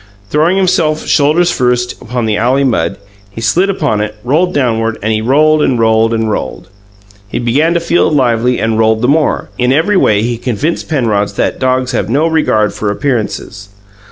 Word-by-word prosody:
Throwing 160 Hz, +5 st, +2 dB
himself, 170 Hz, -5 st, +1 dB
shoulders 160 Hz, +4 st, +2 dB
first, 125 Hz, -2 st, -1 dB
upon 120 Hz, 0 st, -3 dB
the 110 Hz, -1 st, 0 dB
alley 125 Hz, +6 st, +1 dB
mud, 100 Hz, -11 st, 0 dB, 0.3 s
he 100 Hz, -, -10 dB
slid 170 Hz, -, +1 dB
upon 145 Hz, -, -1 dB
it, 105 Hz, 0 st, -4 dB
back 170 Hz, +7 st, +2 dB
downward; 115 Hz, -6 st, -1 dB
he 110 Hz, 0 st, 0 dB
rolled 150 Hz, +6 st, +3 dB
and 130 Hz, -4 st, +1 dB
rolled 115 Hz, 0 st, +2 dB
and 110 Hz, -1 st, -1 dB
rolled. 80 Hz, -1 st, -5 dB, 0.6 s
He -, -, -5 dB
began 145 Hz, +8 st, +1 dB
to -, -, +2 dB
feel 170 Hz, +1 st, +1 dB
lively 125 Hz, -4 st, +1 dB
and 110 Hz, -1 st, -1 dB
rolled 110 Hz, 0 st, +2 dB
the -, -, +3 dB
more; 150 Hz, +2 st, 0 dB
in 125 Hz, +1 st, +2 dB
every 165 Hz, +9 st, +2 dB
way 105 Hz, -, +2 dB
he 120 Hz, 0 st, -2 dB
convinced 130 Hz, +8 st, -3 dB
Penrod 110 Hz, -9 st, 0 dB
that -, -, -1 dB
dogs 130 Hz, 0 st, 0 dB
have 110 Hz, -5 st, -2 dB
no 145 Hz, +7 st, +1 dB
regard 150 Hz, -10 st, +1 dB
for 105 Hz, -, -3 dB
appearances. 105 Hz, -4 st, -3 dB
125 Hz, 180 wpm, -12 LUFS, 110-155 Hz, 0.6 s, rolled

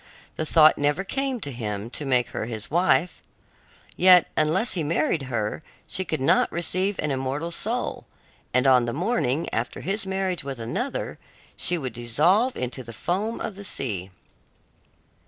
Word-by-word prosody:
The 155 Hz, -, -3 dB
thought 155 Hz, -1 st, +6 dB
never 145 Hz, +5 st, +1 dB
came 270 Hz, +4 st, -2 dB
to 140 Hz, -, -4 dB
him 110 Hz, -2 st, -5 dB
to 145 Hz, -, -4 dB
make 125 Hz, -2 st, +2 dB
her 110 Hz, -, -4 dB
his 110 Hz, 0 st, -5 dB
wife. 175 Hz, -1 st, +2 dB, 0.7 s
Yet 180 Hz, -1 st, +7 dB
unless 170 Hz, +9 st, +2 dB
he 175 Hz, -, -1 dB
married 155 Hz, 0 st, +1 dB
her, 110 Hz, +2 st, -2 dB, 0.2 s
she 190 Hz, -, +4 dB
could 155 Hz, -, -2 dB
not 135 Hz, -, +3 dB
receive 185 Hz, +3 st, -1 dB
an 150 Hz, -, -1 dB
immortal 135 Hz, +5 st, -2 dB
soul, -, -, -2 dB, 0.4 s
and 125 Hz, +1 st, +2 dB
on 130 Hz, -2 st, +5 dB
the 120 Hz, -, -3 dB
morning 165 Hz, -, 0 dB
after 115 Hz, +2 st, -2 dB
his 195 Hz, +3 st, -2 dB
marriage 190 Hz, -3 st, -1 dB
with 135 Hz, -2 st, -6 dB
another, 180 Hz, -, -3 dB, 0.4 s
she 175 Hz, -, +1 dB
would 130 Hz, -7 st, -4 dB
dissolve 155 Hz, -, +2 dB
into 125 Hz, +1 st, -4 dB
the 115 Hz, 0 st, -10 dB
foam 200 Hz, -, -2 dB
of 220 Hz, -, -4 dB
the 200 Hz, -, -9 dB
sea. 100 Hz, -, -2 dB
150 Hz, 160 wpm, -25 LUFS, 125-185 Hz, 0.7 s, Yet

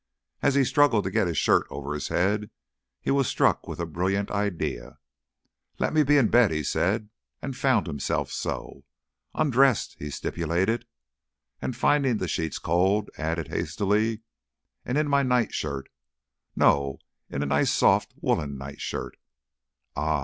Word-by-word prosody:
As 140 Hz, -, +2 dB
he 140 Hz, -, +5 dB
struggled 135 Hz, -5 st, +3 dB
to 95 Hz, -, -3 dB
get 95 Hz, -, +2 dB
his 85 Hz, -4 st, -2 dB
shirt -, -, +3 dB
over 70 Hz, +1 st, -5 dB
his 75 Hz, -, -3 dB
head, 105 Hz, +4 st, 0 dB, 0.5 s
he -, -, -1 dB
was 135 Hz, -2 st, +2 dB
struck -, -, +1 dB
with -, -, -6 dB
a 85 Hz, -, -1 dB
brilliant 95 Hz, +5 st, -1 dB
idea. 100 Hz, -7 st, -3 dB, 0.8 s
"Let -, -, -1 dB
me 155 Hz, -, +5 dB
be 145 Hz, 0 st, +4 dB
in 125 Hz, -6 st, +4 dB
bed," 120 Hz, -2 st, +5 dB
he 75 Hz, -1 st, -2 dB
said, 105 Hz, +9 st, 0 dB, 0.3 s
and 135 Hz, -2 st, -5 dB
found 125 Hz, -5 st, +2 dB
himself 75 Hz, -5 st, -2 dB
so. -, -, -5 dB, 0.5 s
"Undressed," 135 Hz, -3 st, +2 dB
he 75 Hz, -, -5 dB
stipulated; 90 Hz, -, -1 dB, 0.7 s
and, 125 Hz, -, -3 dB
finding 130 Hz, -1 st, +2 dB
the 95 Hz, -, -3 dB
sheets 80 Hz, -1 st, -2 dB
cold, 95 Hz, +5 st, +1 dB
added 80 Hz, 0 st, -2 dB
hastily, 105 Hz, +2 st, 0 dB, 0.6 s
"and 125 Hz, -, -2 dB
in 150 Hz, 0 st, +2 dB
my 140 Hz, -1 st, +3 dB
nightshirt 110 Hz, -, -1 dB, 0.7 s
no, 70 Hz, -1 st, +3 dB, 0.3 s
in 70 Hz, -, -2 dB
a -, -, -1 dB
nice 70 Hz, +1 st, +2 dB
soft -, -, +3 dB
woollen 70 Hz, -2 st, -1 dB
nightshirt. 70 Hz, +1 st, -6 dB, 0.8 s
Ah!" 75 Hz, +1 st, 0 dB
100 Hz, 150 wpm, -26 LUFS, 80-125 Hz, 0.8 s, he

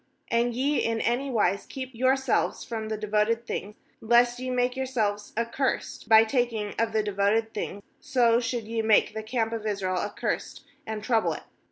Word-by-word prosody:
18And 235 Hz, 0 st, +1 dB
ye, 280 Hz, +4 st, +1 dB
in 230 Hz, 0 st, 0 dB
any 245 Hz, +5 st, 0 dB
wise 200 Hz, -5 st, +1 dB
keep 260 Hz, -1 st, -7 dB
yourselves 260 Hz, +3 st, +1 dB
from 220 Hz, -2 st, -5 dB
the 215 Hz, -, -2 dB
devoted 215 Hz, +2 st, 0 dB
thing, 210 Hz, -2 st, -5 dB, 0.3 s
lest 240 Hz, +2 st, +4 dB
ye 255 Hz, 0 st, -4 dB
make 250 Hz, 0 st, +1 dB
your 265 Hz, 0 st, -2 dB
selves 210 Hz, -5 st, -1 dB
accursed 235 Hz, +3 st, -2 dB
by 220 Hz, 0 st, +8 dB
taking 225 Hz, -3 st, -1 dB
of 230 Hz, 0 st, +1 dB
the 220 Hz, -1 st, +1 dB
de 210 Hz, -, -2 dB
voted 215 Hz, +3 st, +1 dB
thing, 205 Hz, -1 st, -5 dB, 0.2 s
so 245 Hz, -5 st, +3 dB
should 235 Hz, -1 st, -2 dB
ye 225 Hz, +1 st, -2 dB
make 220 Hz, -1 st, +3 dB
the 220 Hz, -, -4 dB
camp 225 Hz, 0 st, -1 dB
of 220 Hz, -1 st, -3 dB
Israel 190 Hz, -3 st, -1 dB
accursed, 205 Hz, +3 st, -3 dB, 0.2 s
and 215 Hz, -1 st, -4 dB
trouble 225 Hz, -1 st, +2 dB
it. -, -, -8 dB
230 Hz, 185 wpm, -27 LUFS, 215-245 Hz, 0.3 s, by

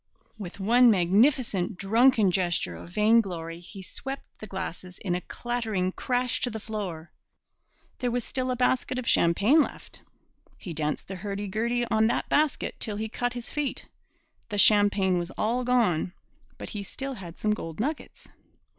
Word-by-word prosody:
With 195 Hz, 0 st, -8 dB
one 240 Hz, +5 st, +5 dB
magnificent 200 Hz, 0 st, +2 dB
drunken 220 Hz, +1 st, +4 dB
gesture 175 Hz, -2 st, 0 dB
of -, -, -10 dB
vainglory 190 Hz, -5 st, +1 dB
he 190 Hz, +2 st, -10 dB
swept 270 Hz, +8 st, -7 dB
the 215 Hz, -, -8 dB
glasses 185 Hz, -2 st, -6 dB
in 185 Hz, -4 st, -2 dB
a 180 Hz, -, -1 dB
clattering 220 Hz, -7 st, -2 dB
crash 250 Hz, +4 st, -1 dB
to 250 Hz, -, +1 dB
the 220 Hz, -1 st, -5 dB
floor. 195 Hz, -7 st, -5 dB, 0.9 s
There 250 Hz, -, 0 dB
was 245 Hz, 0 st, -1 dB
still 255 Hz, +2 st, -3 dB
a 255 Hz, -, 0 dB
basket 255 Hz, +1 st, +1 dB
of 255 Hz, -, -4 dB
champagne 205 Hz, -, +4 dB
left. -, -, -6 dB, 0.6 s
He 175 Hz, -, -7 dB
danced 150 Hz, -1 st, -2 dB
the 190 Hz, -, -6 dB
hurdy 200 Hz, +1 st, -4 dB
gurdy 235 Hz, +4 st, 0 dB
on 220 Hz, 0 st, +4 dB
that -, -, -1 dB
basket 300 Hz, -1 st, +1 dB
till 210 Hz, -, -2 dB
he 220 Hz, +1 st, -3 dB
cut 245 Hz, +2 st, -2 dB
his 245 Hz, -1 st, -6 dB
feet. 295 Hz, -2 st, -2 dB, 0.6 s
The 205 Hz, -, -3 dB
champagne 200 Hz, -3 st, +5 dB
was 175 Hz, 0 st, -4 dB
all 240 Hz, +4 st, 0 dB
gone, 225 Hz, -9 st, +2 dB, 0.4 s
but -, -, -7 dB
he 205 Hz, -, -4 dB
still 270 Hz, +7 st, -5 dB
had 175 Hz, -8 st, -9 dB
some 215 Hz, -, 0 dB
gold 165 Hz, -5 st, -6 dB
nuggets. 290 Hz, +7 st, -4 dB
215 Hz, 165 wpm, -27 LUFS, 185-245 Hz, 0.9 s, one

